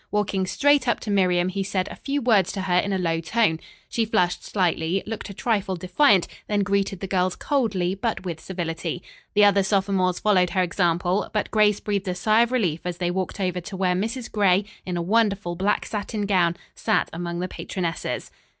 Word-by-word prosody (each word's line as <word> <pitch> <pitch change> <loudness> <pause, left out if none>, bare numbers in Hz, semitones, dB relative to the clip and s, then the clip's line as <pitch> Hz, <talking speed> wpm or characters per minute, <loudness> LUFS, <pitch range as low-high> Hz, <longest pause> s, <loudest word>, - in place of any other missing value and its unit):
Walking 195 -2 0
straight 285 +3 +3
up 240 - +2
to 210 - -4
Miriam, 180 -3 +2
he 195 +1 -3
said 190 0 -1
a - - -7
few 280 -1 -3
words 210 -7 +3
to 195 - -3
her 180 -1 +1
in 200 - -1
a 190 - +1
low 165 -3 0
tone. 165 -1 +1 0.3
She 230 - 0
flushed 180 -5 0
slightly, 180 -1 0
looked 220 -1 -6
a - - -7
trifle 200 -5 0
defiant 185 - +3 0.2
then 205 -1 +1
greeted 200 -2 0
the - - -2
girls 185 -1 +1
coldly, 210 - 0
but 200 0 -3
with 170 -3 -4
civility. 170 -1 -4 0.3
The 205 0 +6
other 200 -1 +5
sophomores 190 -2 +1
followed 185 -4 +3
her 185 +1 +1
example, 175 +1 0
but 210 - -1
Grace 210 -1 +3
breathed 200 -2 -2
a 180 - -1
sigh 215 +5 +3
of 235 +1 +2
relief 185 -11 +1
as 180 -1 -4
they 175 -1 -1
walked 185 +2 -3
over 180 -2 -1
to 190 +2 -8
where 185 -1 +2
Mrs. 225 +6 -3
Gray, 200 -2 +3 0.2
in 180 -1 -2
a 170 - -1
wonderful 200 -3 +1
black 195 +4 0
satin 210 0 -3
gown, 175 -4 +2 0.2
sat - - +1
among 170 +1 -4
the 180 - -2
patronesses. 175 -2 -4
190 Hz, 200 wpm, -24 LUFS, 180-210 Hz, 0.3 s, The